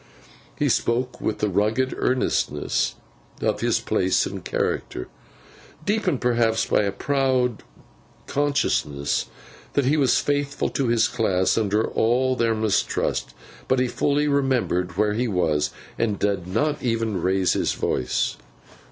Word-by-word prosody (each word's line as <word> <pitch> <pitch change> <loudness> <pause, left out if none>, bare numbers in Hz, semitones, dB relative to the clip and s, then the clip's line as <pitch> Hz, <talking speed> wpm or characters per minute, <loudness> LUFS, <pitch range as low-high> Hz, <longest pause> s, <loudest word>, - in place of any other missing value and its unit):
He - - +1
spoke 125 +1 0
with 105 - -1
the 105 - 0
rugged 110 +7 +1
earnestness 125 - 0 0.4
of - - -1
his - - +2
place 95 0 +1
and - - -6
character—deepened 180 - -4
perhaps 115 -2 +2
by - - +2
a 100 -1 0
proud 130 +1 0 0.6
consciousness 135 - 0 0.5
that 140 - +2
he 145 +4 +3
was 135 -5 +3
faithful 145 -1 -1
to 135 - -1
his 115 0 +3
class 95 -7 +1
under 110 0 +1
all 130 +3 +1
their 115 -2 +1
mistrust; 110 -2 0 0.3
but 130 - +2
he 125 - +2
fully 145 +4 +1
remembered 125 -11 0
where 105 0 +2
he 120 +3 0
was, 80 -7 +1 0.3
and 105 -3 0
did 100 -3 -1
not 150 +10 0
even 115 -5 -1
raise 95 +1 +2
his - - 0
voice. 65 - -1
115 Hz, 130 wpm, -24 LUFS, 100-130 Hz, 0.6 s, he